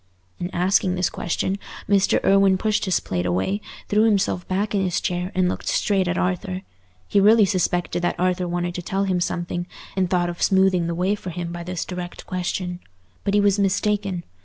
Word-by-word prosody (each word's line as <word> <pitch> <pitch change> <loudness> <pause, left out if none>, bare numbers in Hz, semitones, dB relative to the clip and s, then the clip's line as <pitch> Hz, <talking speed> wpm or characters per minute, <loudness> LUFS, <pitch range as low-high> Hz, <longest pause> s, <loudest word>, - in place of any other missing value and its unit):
In 175 - -3
asking 185 0 +2
this 180 -1 0
question, 190 +3 -2 0.3
Mr. 200 -1 +3
Irwine 195 -1 +5
pushed 215 +2 0
his 185 - +2
plate 90 -1 -2
away, 95 - 0 0.3
threw 210 +1 +3
himself 200 -4 +1
back 200 +3 -1
in 200 -2 +2
his 180 -2 0
chair, 180 +1 -2
and 185 -1 +3
looked - - -3
straight 195 -3 +1
at 175 +1 0
Arthur. 185 +1 -1 0.4
He 200 - +3
really 210 +2 +6
suspected 175 -1 0
that 175 0 -1
Arthur 180 0 +1
wanted 175 0 -2
to 180 - -4
tell 195 +3 -1
him 185 -2 0
something, 175 0 -2 0.3
and 185 -2 +1
thought 175 -1 +1
of 170 - -10
smoothing 190 -3 +3
the 170 - -2
way 185 +4 +1
for 200 -3 -5
him 170 0 -4
by 175 0 -6
this 180 0 -4
direct 180 -1 -6
question. 180 0 -3 0.4
But 200 0 0
he - - +5
was 205 0 +3
mistaken. 200 -2 0
185 Hz, 195 wpm, -23 LUFS, 175-195 Hz, 0.4 s, really